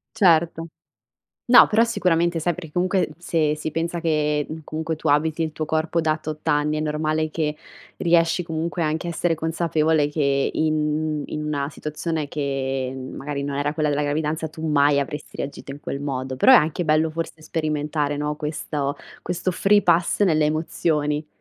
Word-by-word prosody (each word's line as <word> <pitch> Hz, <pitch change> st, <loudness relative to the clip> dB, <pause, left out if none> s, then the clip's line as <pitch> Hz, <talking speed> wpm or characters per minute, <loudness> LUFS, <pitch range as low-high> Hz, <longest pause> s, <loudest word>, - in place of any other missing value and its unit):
Certo. 170 Hz, -3 st, +3 dB, 0.8 s
No, 245 Hz, 0 st, +8 dB
però 220 Hz, +2 st, +4 dB
sicuramente 170 Hz, -6 st, +1 dB
sai, 175 Hz, +1 st, +1 dB
perché 165 Hz, -3 st, -9 dB
comunque, 185 Hz, 0 st, +1 dB
se 160 Hz, -3 st, 0 dB
si 155 Hz, 0 st, -4 dB
pensa 170 Hz, +1 st, -2 dB
che, 150 Hz, -2 st, +1 dB, 0.2 s
comunque 160 Hz, 0 st, -3 dB
tu 160 Hz, -, -4 dB
abiti 155 Hz, +3 st, +2 dB
il 155 Hz, -1 st, -3 dB
tuo 155 Hz, -, -3 dB
corpo 160 Hz, +2 st, 0 dB
da 155 Hz, -1 st, +1 dB
tot 155 Hz, 0 st, -7 dB
anni, 150 Hz, 0 st, +2 dB
è -, -, -1 dB
normale 155 Hz, +1 st, -1 dB
che 155 Hz, -1 st, -2 dB, 0.4 s
riesci, 170 Hz, 0 st, +2 dB
comunque, 165 Hz, +1 st, -3 dB
anche 160 Hz, +3 st, -1 dB
a -, -, -1 dB
essere 170 Hz, 0 st, 0 dB
consapevole 160 Hz, -2 st, +1 dB
che 140 Hz, -2 st, +1 dB
in 155 Hz, -1 st, 0 dB
in 150 Hz, 0 st, -4 dB
una 145 Hz, -1 st, -2 dB
situazione 155 Hz, 0 st, -4 dB
che, 135 Hz, -2 st, -2 dB, 0.2 s
magari, 140 Hz, 0 st, -4 dB
non 140 Hz, -1 st, -3 dB
era 145 Hz, +1 st, 0 dB
quella 155 Hz, -1 st, 0 dB
della 145 Hz, +1 st, 0 dB
gravidanza, 155 Hz, +2 st, -1 dB
tu 160 Hz, +1 st, -7 dB
mai 145 Hz, -1 st, +4 dB
avresti 145 Hz, +1 st, -5 dB
reagito 140 Hz, 0 st, -6 dB
in 140 Hz, -, -9 dB
quel 140 Hz, -1 st, -5 dB
modo, 130 Hz, -2 st, -3 dB
però 260 Hz, -, +5 dB
è -, -, +10 dB
anche 160 Hz, +1 st, +2 dB
bello 155 Hz, 0 st, +2 dB
forse 160 Hz, 0 st, -5 dB
sperimentare, 150 Hz, -2 st, -2 dB
no, 150 Hz, 0 st, -2 dB
questo 150 Hz, -1 st, -3 dB, 0.2 s
questo 180 Hz, +1 st, -2 dB
free-pass 185 Hz, 0 st, +3 dB
nelle 155 Hz, -5 st, +3 dB
emozioni. 150 Hz, -1 st, -1 dB
155 Hz, 170 wpm, -23 LUFS, 150-165 Hz, 0.8 s, è